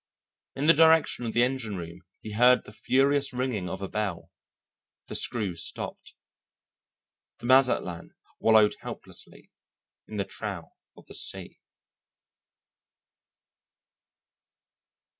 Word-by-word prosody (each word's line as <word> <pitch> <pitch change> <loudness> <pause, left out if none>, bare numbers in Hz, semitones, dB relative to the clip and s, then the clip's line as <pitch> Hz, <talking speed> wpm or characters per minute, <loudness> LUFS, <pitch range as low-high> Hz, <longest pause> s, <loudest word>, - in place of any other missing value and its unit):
In 140 - -2
the 165 - +7
direction 160 -6 +4
of 110 - -4
the 120 - +4
engine 125 -6 -2
room 85 -1 -8 0.2
he 110 - -8
heard 125 +4 +4
the - - -13
furious 135 +5 +2
ringing 125 -7 -2
of 95 +3 -6
a - - -3
bell. 100 -5 -4 0.8
The - - -8
screw 105 -7 +1
stopped. 85 - -4 1.2
The 120 - -11
Mazatlan 125 -9 +2 0.2
wallowed 110 -2 +5
helplessly - - -10 0.6
in 110 - -7
the 100 - -1
trough 95 -6 -7 0.3
of - - -16
the - - -13
sea. - - -2
110 Hz, 110 wpm, -27 LUFS, 100-130 Hz, 1.2 s, the